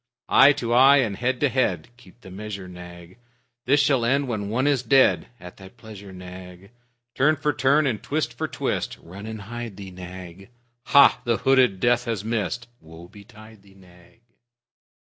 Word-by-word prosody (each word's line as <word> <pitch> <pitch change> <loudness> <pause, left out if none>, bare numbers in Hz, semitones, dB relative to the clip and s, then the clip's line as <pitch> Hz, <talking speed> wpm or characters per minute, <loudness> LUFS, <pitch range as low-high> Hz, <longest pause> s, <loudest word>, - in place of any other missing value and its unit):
Eye 135 +2 +7
to 120 -3 -3
eye 135 +3 +6
and 115 -7 0
head 125 +4 -2
to 145 - +3
head, 105 -11 -1
(Keep 125 -1 -20
the 95 - -13
measure, 100 -1 -8
Nag.) 90 +2 -13 0.5
This 145 +3 +3
shall 135 -4 +2
end 135 +4 +1
when 105 -4 -4
one 125 +5 -1
is 140 -4 +2
dead; 130 +2 +3
(At 90 0 -12
thy 95 -1 -13
pleasure, 105 -4 -13
Nag.) 90 +1 -12 0.4
Turn 150 +4 +2
for 150 0 -1
turn 140 +4 +2
and 120 -6 -2
twist 150 +1 -3
for - - -3
twist - - -3
(Run 100 +5 -11
and 110 -1 -7
hide 120 -1 -8
thee, 95 -2 -9
Nag.) 90 +1 -11 0.4
Hah! 140 -3 +5
The 120 -2 0
hooded 130 -8 +2
Death 120 +3 +1
has 110 -4 -4
missed! 115 +2 -3
(Woe 80 +2 -14
betide 110 0 -16
thee, 100 -1 -21
Nag!) 90 +3 -21
110 Hz, 175 wpm, -23 LUFS, 95-130 Hz, 0.5 s, Eye